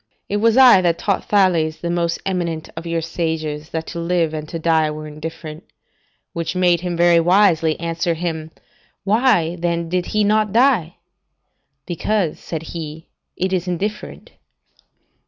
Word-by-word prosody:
It 205 - 0
was 225 +3 +3
I 250 -7 +8
that 170 -2 +1
taught 200 -2 -1
Thales, 175 -6 +2
the 170 - -2
most 170 -1 0
eminent 170 -4 -2
of 165 +1 -7
your 165 0 -1
sages, 160 -2 -3
that 160 0 -4
to 170 - -6
live 170 -2 0
and 155 0 -5
to 165 - -4
die 160 -1 +2
were 155 0 -6
indifferent; 155 +1 -8 0.7
which 170 +1 -3
made 175 -2 +3
him, 175 -1 -3
very 170 0 +5
wisely, 165 -3 +3
answer 165 0 -1
him, 160 -2 -4 0.5
'Why 195 -6 +2
then 170 -1 -2
he 180 0 +1
did 210 +3 0
not 215 0 +2
die?' 230 - +3 0.9
'Because,' 180 0 -1
said 160 -2 -6
he, 160 -1 -7 0.3
'it 185 +1 -1
is 185 -1 -1
indifferent. 195 +4 -4
170 Hz, 155 wpm, -20 LUFS, 160-185 Hz, 0.9 s, I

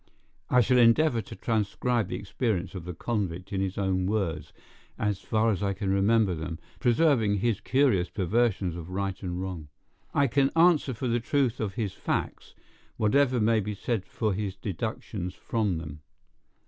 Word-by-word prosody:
I 125 - +5
shall 125 +2 +3
endeavor 120 +1 +4
to 100 - -10
transcribe 115 0 0
the - - -4
experience 100 -3 -2
of 90 -4 -7
the 90 -1 -6
convict 95 -3 -3
in 95 - 0
his 95 -1 -2
own 95 -2 0
words, 85 -8 -2 0.5
as 105 -2 -1
far 110 +1 +1
as 95 - -2
I 100 -1 0
can 95 0 -2
remember 100 0 +3
them, 80 0 -5 0.2
preserving 120 -5 +3
his 110 0 0
curious 130 -10 +2
perversions 100 -2 0
of 85 0 -7
right 95 0 -3
and 90 -1 -4
wrong. 90 -5 -5 0.4
I 140 - +3
can 135 +2 +2
answer 165 -6 +4
for 125 +4 -3
the 120 0 +1
truth 125 0 0
of 105 -3 -3
his 110 -6 -2
facts, - - -3 0.4
whatever 125 +3 +3
may 110 +1 +3
be 105 0 -3
said 110 -1 -2
for 110 -3 -1
his 100 -1 -3
deductions 95 -1 -4
from 105 -6 -1
them. 75 -2 -8
105 Hz, 170 wpm, -27 LUFS, 95-120 Hz, 0.5 s, I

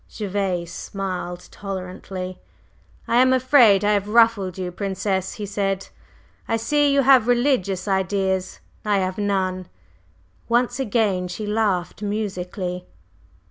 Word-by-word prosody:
Gervase 190 -4 -3
smiled 180 -2 -5
tolerantly. 185 -1 -6 0.7
"I 235 - +2
am 255 +1 +5
afraid 250 -6 +5
I 210 - +3
have 205 -1 +1
ruffled 220 -5 +3
you, 180 -1 -3
Princess," 190 0 -2
he 210 - -5
said. 195 -1 -2 0.6
"I 225 - +1
see 290 +5 +2
you 275 0 +3
have 260 -3 +6
religious 240 -7 +1
ideas: 190 -1 -1 0.2
I 210 -1 +2
have 185 +1 -1
none." 185 -3 -1 0.8
Once 240 +3 +1
again 205 -7 +1
she 195 +4 -5
laughed 205 -4 -1
musically. 185 -3 -4
200 Hz, 120 wpm, -22 LUFS, 185-225 Hz, 0.8 s, have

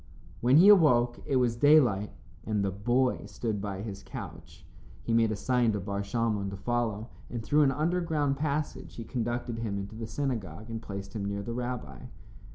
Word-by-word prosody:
When 125 +4 +5
he 180 +5 +8
awoke 125 -12 +5
it 140 - 0
was 125 -2 +2
daylight, 120 -7 +4 0.3
and 105 -2 0
the 95 - 0
boy 120 +4 0
stood 105 0 -3
by 100 -1 -4
his 100 -3 -6
couch. - - -10 0.4
He 115 - -1
made 115 -1 +3
a - - -1
sign 120 +1 +1
to 105 - -1
Bar 100 +1 -3
Shalmon 105 -1 -1
to 100 - -7
follow, 115 0 -2 0.2
and 115 -2 -5
through 150 +6 +3
an 140 -2 +4
underground 155 -2 0
passage 150 +1 -3
he 115 - -6
conducted 120 0 -3
him 105 -3 -2
into 100 +2 -6
the 110 0 -5
synagogue 110 - -4
and 115 -1 -4
placed 100 -1 -7
him 100 -2 -3
near 100 0 -3
the 115 - -4
rabbi. 120 - -5
115 Hz, 185 wpm, -29 LUFS, 100-130 Hz, 0.4 s, he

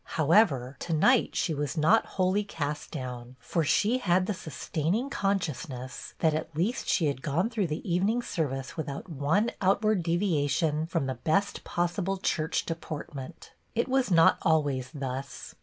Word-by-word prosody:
However, 145 - +3
to 170 - -3
night 240 +11 +3
she 165 - 0
was 145 +2 -3
not 185 +9 +4
wholly 185 +2 +2
cast 150 -6 -4
down, 125 -4 -6
for 160 +7 -1
she 215 - +2
had 185 -4 +2
the 210 - -1
sustaining 180 - -2
conscious 185 - -1
ness 130 +1 -8
that 160 -2 +4
at 155 0 -4
least 200 - -1
she 170 - +2
had 140 -3 -1
gone 170 - 0
through 215 -6 0
the 155 +4 -5
evening 195 +7 +1
service 135 - -3
without 150 +2 -5
one 160 - +1
outward 200 0 +2
devia 165 -4 +1
tion 155 +2 0
from 165 -5 -1
the 130 - -1
best 200 +6 0
possible 180 +3 -1
church 160 -4 -1
deport 165 -1 -5
ment. 140 +4 -9 0.2
It 235 - +1
was 265 -2 +1
not 165 -3 +5
always 145 -5 +1
thus. 135 -3 -6
165 Hz, 165 wpm, -28 LUFS, 145-195 Hz, 0.2 s, not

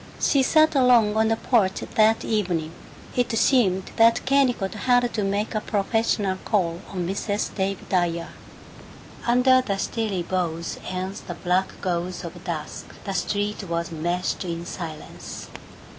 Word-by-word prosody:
She 280 - +3
sat 310 +4 +4
alone 245 -6 +4
on 220 0 +3
the 225 - +2
porch, 210 -5 +1
that 220 +1 +3
evening. 180 -8 -1 0.4
It 245 -1 +1
seemed 195 -8 +2
that 230 0 +5
Kennicott 260 -8 +2
had 245 +2 +2
to 210 - -1
make 200 +2 -1
a 215 - -1
professional 205 -2 0
call 175 -5 0
on 180 -3 -3
Mrs. 200 +2 -2
Dave 195 -1 -2
Dyer. 170 -2 0 1.0
Under 255 +2 +5
the 200 -6 -2
stilly 205 -4 -2
boughs 170 -2 -2
and 185 +1 -3
the 175 - -5
black 180 +2 -1
gauze 180 -1 -2
of 170 - -8
dusk 160 -4 -5 0.2
the 195 - -4
street 205 +2 -1
was 170 -1 -3
meshed 175 +4 -2
in 170 -1 -4
silence. 165 -3 -7
195 Hz, 145 wpm, -24 LUFS, 175-225 Hz, 1.0 s, that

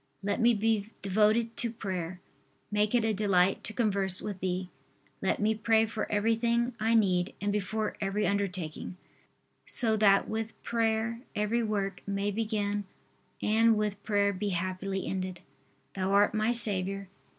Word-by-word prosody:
Let 205 +4 -1
me 235 0 +4
be 215 0 0
devoted 215 +4 +1
to 235 - +2
prayer. 185 -5 -5 0.5
Make 210 +2 +1
it 235 -2 +2
a 220 - +1
delight 195 -2 +1
to - - -3
converse 200 -5 +2
with 205 -3 -6
Thee. 185 0 -3 0.5
Let - - 0
me 215 +1 +2
pray 220 0 +2
for 220 0 -5
everything 230 +3 +1
I 225 +2 +1
need 185 -4 +1
and 205 0 -1
before 210 +2 -2
every 200 +1 -1
undertaking, 185 -4 -3 0.7
so 225 -3 +4
that 200 -2 +4
with 225 0 -5
prayer 230 0 -1
every 210 +3 0
work 200 -4 -3
may 200 +1 -1
begin 205 -1 -2 0.6
and 225 +1 +3
with 210 -1 -2
prayer 205 -1 +1
be 200 +2 -3
happily 185 +1 -3
ended. 185 -2 -4 0.5
Thou 190 0 -2
art 205 +2 +3
my 215 +2 +1
Saviour. 195 -4 +6
210 Hz, 150 wpm, -29 LUFS, 195-220 Hz, 0.7 s, Saviour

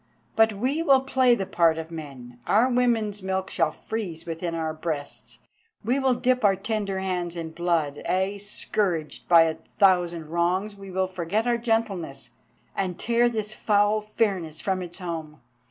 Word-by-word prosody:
But 225 0 +4
we 260 +10 -1
will 275 -5 +5
play 260 -2 +3
the 195 - -3
part 165 -3 +3
of 160 0 -6
men. 135 -7 -9
Our 225 +5 +4
women's 225 -4 +1
milk 190 0 -2
shall 155 - +2
freeze 175 -2 -5
within 165 0 -3
our 160 -1 -2
breasts, 155 -2 -5 0.5
we 250 +5 +2
will 265 -2 +2
dip 250 0 +1
our 200 -2 +5
tender 200 -1 -2
hands 180 -2 -2
in 165 -1 -5
blood, 160 -4 -1
ay, 190 +2 0
scourged 195 -5 -2
by 170 -2 +8
a 160 -1 -1 0.2
thousand 175 -5 +3
wrongs 180 +5 0
we 195 -1 -11
will 190 0 0
forget 185 +4 -2
our 240 -1 +1
gentleness, 220 - -2 0.4
and 185 -3 -2
tear 235 +1 +2
this 215 -2 -3
foul 210 0 +2
fairness 195 -7 -1
from 190 -1 -1
its 175 -1 -7
home. 165 -4 -6
190 Hz, 165 wpm, -25 LUFS, 165-220 Hz, 0.5 s, by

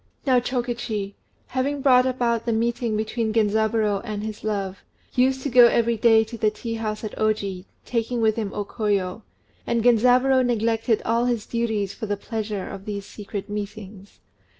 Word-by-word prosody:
Now 255 -3 +4
Chokichi, 240 -5 -3 0.4
who 260 - +1
had 280 +1 -2
brought 255 -2 +5
about 240 -2 0
the - - +2
meeting 230 0 0
between 220 +1 -1
Genzaburô 220 -1 +1
and 210 -3 -4
his 215 -1 -6
love, 200 -3 -2 0.3
used 260 +1 +2
to 285 - -1
go 245 -1 +8
every 235 0 +2
day 225 0 +5
to 225 +1 -9
the 215 - +3
tea 230 +2 -6
house 215 -1 -3
at 215 - -5
Oji, 200 -4 -1 0.2
taking 235 0 -1
with 220 -1 +3
him 215 -3 -3
O 205 - -3
Koyo; 205 -2 -1 0.5
and 235 -1 +1
Genzaburô 250 +2 +4
neglected 225 -1 +1
all 230 +1 +2
his 235 -3 -1
duties 220 -4 -1
for 220 - -6
the 205 0 -1
pleasure 210 -2 -4
of 195 0 -8
these 200 -2 -5
secret 205 -1 -7
meetings. 205 -1 -7
220 Hz, 175 wpm, -24 LUFS, 210-240 Hz, 0.5 s, go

